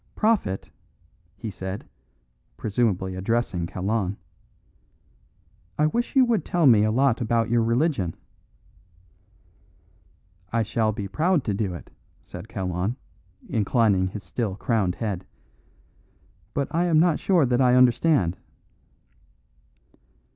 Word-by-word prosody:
"Prophet," 210 - 0 0.7
he 105 +2 -5
said, 95 +1 -6 0.7
presumably 100 -4 0
addressing 95 -3 -1
Kalon, 100 +2 -2 1.6
"I 150 - +3
wish 235 - -1
you 265 -1 +6
would 230 -8 +1
tell 175 -2 +1
me 115 -6 +6
a 110 - +2
lot 130 0 +2
about 115 0 0
your 120 -1 +3
religion." 115 - 0 2.4
"I 115 -1 +1
shall 110 0 0
be 100 -2 -5
proud 160 - +1
to 105 - -1
do 95 -3 -2
it," - - -11 0.3
said 90 +5 -10
Kalon, 95 +3 -2 0.5
inclining 105 -3 +2
his 100 +2 -7
still 110 -6 -3
crowned 105 -5 0
head, 100 -5 -3 1.3
"but 140 -1 0
I 170 +2 +2
am 165 -3 +3
not 170 -2 +3
sure 180 -7 +3
that 125 +1 +1
I 125 -1 +5
understand." 125 - +3
115 Hz, 115 wpm, -25 LUFS, 95-135 Hz, 2.4 s, you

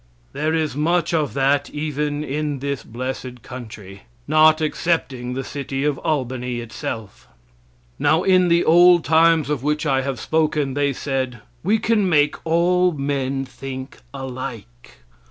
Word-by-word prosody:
There 155 +2 0
is 155 -4 -1
much 170 +4 +1
of 150 -7 0
that 140 +1 +2
even 150 0 -2
in 150 0 -2
this 140 0 -3
blessed 125 0 -6
country 105 -7 -10 0.3
not 155 +1 +5
excepting 145 -6 -1
the 135 - -3
city 135 0 -4
of 150 -1 0
Albany 125 -5 -2
itself. 110 -2 -7 0.7
Now 155 +4 +3
in 185 -1 +4
the 170 0 +3
old 175 +1 +6
times 160 0 +4
of 150 -4 -1
which 150 +2 -1
I 135 -2 +2
have 135 -2 -3
spoken, 155 -2 0
they 145 0 +1
said, 130 -3 -3 0.2
"We 205 +6 +2
can 215 -3 +1
make 150 -3 +2
all 180 +2 +3
men 135 -2 -2
think 130 0 -8
alike." 125 - -8
145 Hz, 140 wpm, -21 LUFS, 130-155 Hz, 0.7 s, old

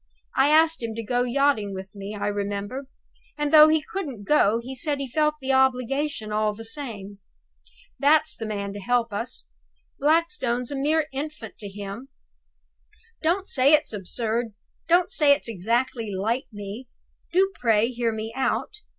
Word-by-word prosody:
I 270 +2 +4
asked 320 0 +4
him 225 -1 -4
to 230 - -4
go 245 +3 0
yachting 245 -5 +1
with 190 +1 -8
me, 205 +1 -7
I 200 - -2
remember; 205 +5 -3 0.5
and, 295 0 -1
though 305 0 +10
he 310 -1 +2
couldn't 285 - -5
go, 230 -4 +3
he 250 +3 -7
said 290 +2 -1
he 275 -1 -4
felt 300 +4 +1
the 265 -1 -1
obligation 265 -2 +1
all 210 0 0
the 225 +1 -8
same. 220 -6 -6 0.8
That's 310 +2 +3
the 225 - -5
man 200 -2 -4
to 205 - -7
help 235 +1 0
us. 230 +4 -4 0.5
Blackstone's 290 -6 +1
a - - -3
mere 300 +3 +1
infant 275 -5 -6
to 205 - -7
him. 200 +5 -7 1.1
Don't 360 +5 +1
say 275 +2 +5
it's 300 -6 +3
absurd; 220 +3 -2 0.3
don't 350 +1 +3
say 290 -2 +5
it's 285 - -3
exactly 230 +2 -1
like 225 +7 -1
me. 205 +4 -8 0.4
Do 385 +2 +3
pray 225 -1 +3
hear 235 -2 -1
me 220 +1 -5
out. 265 +9 -1
245 Hz, 160 wpm, -25 LUFS, 215-290 Hz, 1.1 s, though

